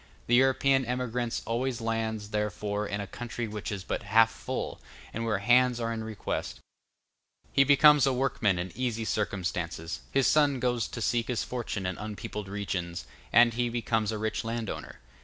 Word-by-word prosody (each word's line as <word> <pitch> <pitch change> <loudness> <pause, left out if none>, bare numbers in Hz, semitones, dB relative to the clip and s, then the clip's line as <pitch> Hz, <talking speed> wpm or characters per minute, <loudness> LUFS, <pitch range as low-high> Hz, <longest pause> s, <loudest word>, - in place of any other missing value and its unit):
The 120 - -1
European 135 +1 +4
emigrant 125 -1 -2
always 120 +2 -1
lands, 110 -2 -2
therefore, 105 0 -2
in 100 0 -3
a 100 - -3
country 120 +2 -5
which 105 +1 -5
is 100 -2 -4
but - - -3
half 110 +2 +4
full, - - -5 0.3
and 115 +2 -3
where 110 -3 +1
hands 120 +4 +4
are 115 0 -1
in 110 -1 -4
request: 110 -2 -4 0.9
he 135 - +6
becomes 145 0 +6
a - - +3
workman 125 -7 +1
in 90 +1 -3
easy 120 -3 -2
circumstances; 90 -6 -2
his 135 -1 +3
son 145 -3 +4
goes 120 -2 0
to 115 - -7
seek 115 +2 +1
his 125 -3 -1
fortune 120 -5 -4
in 90 -1 -3
unpeopled 105 -1 -6
regions, 95 -4 -3 0.3
and 120 0 +6
he 120 +1 0
becomes 115 -2 0
a 110 - -3
rich 110 +1 -2
landowner. 115 -2 -5
115 Hz, 170 wpm, -29 LUFS, 105-125 Hz, 0.9 s, he